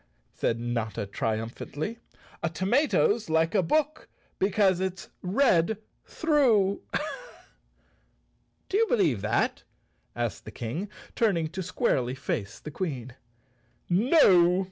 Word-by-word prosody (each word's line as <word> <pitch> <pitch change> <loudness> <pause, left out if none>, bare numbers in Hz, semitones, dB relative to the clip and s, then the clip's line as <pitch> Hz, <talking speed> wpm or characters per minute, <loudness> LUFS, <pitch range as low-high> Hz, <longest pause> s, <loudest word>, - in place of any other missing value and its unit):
said 115 - -1
Notta 115 -4 -2
triumphantly. 115 - -4 0.4
"A 170 - 0
tomato's 215 - +1
like 160 +1 +2
a 200 - +4
book 305 - 0 0.3
because 195 -1 +3
it's 190 -1 -4
red 190 -2 +2 0.3
through." 245 - +2 1.9
"Do 390 - 0
you 455 - +3
believe 160 - +2
that?" 105 +2 0 0.5
asked 120 -2 -3
the - - -7
King, 125 - -5 0.3
turning 180 -9 +1
to 190 +4 -5
squarely 165 - 0
face 105 -6 -4
the 150 - -8
Queen. 135 -8 -4 0.8
"No!" 185 - +5
180 Hz, 105 wpm, -27 LUFS, -, 1.9 s, No